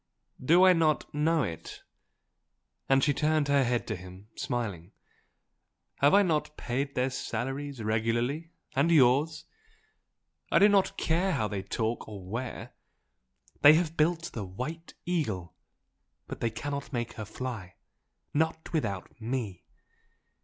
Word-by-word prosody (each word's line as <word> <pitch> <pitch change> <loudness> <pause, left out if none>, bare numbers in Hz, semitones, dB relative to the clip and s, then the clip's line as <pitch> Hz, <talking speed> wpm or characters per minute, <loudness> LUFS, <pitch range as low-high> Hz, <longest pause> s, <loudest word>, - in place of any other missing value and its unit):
"Do 170 +7 +6
I 185 - +8
not 160 -3 +1
know 155 +1 +2
it?" 85 -7 -6 1.1
And 135 0 +4
she 145 - +3
turned 150 0 +1
her 140 -1 +4
head 120 -1 0
to 110 - -3
him, 95 +2 -12
smiling, 105 -7 -4 1.0
"Have 145 +4 +5
I 205 - +6
not 155 -4 -1
paid 135 +4 -2
their 130 +1 +1
salaries 135 0 -4
regularly? 120 +8 0 0.3
and 140 +5 +3
yours? 150 +2 +4 1.1
I - - +5
do 205 - +7
not 200 -2 +2
care 175 +4 +1
how 110 -8 0
they 100 -2 -3
talk 110 +4 -2
or 100 -3 -8
where, 120 +6 -5 0.9
they 145 - +10
have 165 -1 0
built 165 +2 +1
the 110 - -4
White 130 - -6
Eagle, 110 - -2 0.7
but - - -7
they 115 - 0
cannot 140 +6 -5
make 120 -3 -3
her 110 - -6
fly! 110 -5 -6 0.6
not 160 +2 -1
without 110 - -3
ME! 115 -6 -3
135 Hz, 135 wpm, -29 LUFS, 110-155 Hz, 1.1 s, they